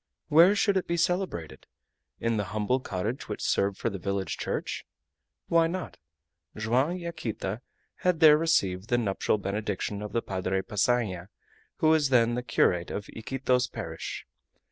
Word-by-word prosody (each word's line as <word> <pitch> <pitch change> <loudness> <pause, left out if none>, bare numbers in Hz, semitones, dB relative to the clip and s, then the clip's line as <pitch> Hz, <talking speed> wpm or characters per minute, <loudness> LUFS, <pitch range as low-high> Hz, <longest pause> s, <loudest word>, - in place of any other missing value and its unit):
Where 170 +6 +7
should 200 -2 +2
it 185 - -1
be 170 - 0
celebrated? 175 - -2 0.5
In 115 -1 0
the 105 - -1
humble 115 +5 +1
cottage 110 +2 -4
which 105 - -4
served 100 0 +1
for 115 - -1
the 100 - -5
village 100 +1 -2
church? - - -3 0.6
Why 165 -1 +4
not? 180 +2 -5 0.6
Joam 120 +7 +2
and 180 +1 -3
Yaquita 115 - -4 0.4
had 180 -3 +1
there 155 -2 +8
received 105 - +1
the 120 - +3
nuptial 105 -2 0
benediction 100 0 -3
of 105 - -5
the 115 - -1
Padre 95 0 -2
Passanha, 105 -4 0 0.5
who 155 - +2
was 155 -3 +4
then 120 -2 +4
the 125 - -1
curate 90 -7 +1
of 105 - -5
Iquitos 125 +2 0
parish. 80 0 -6
115 Hz, 155 wpm, -28 LUFS, 100-155 Hz, 0.6 s, there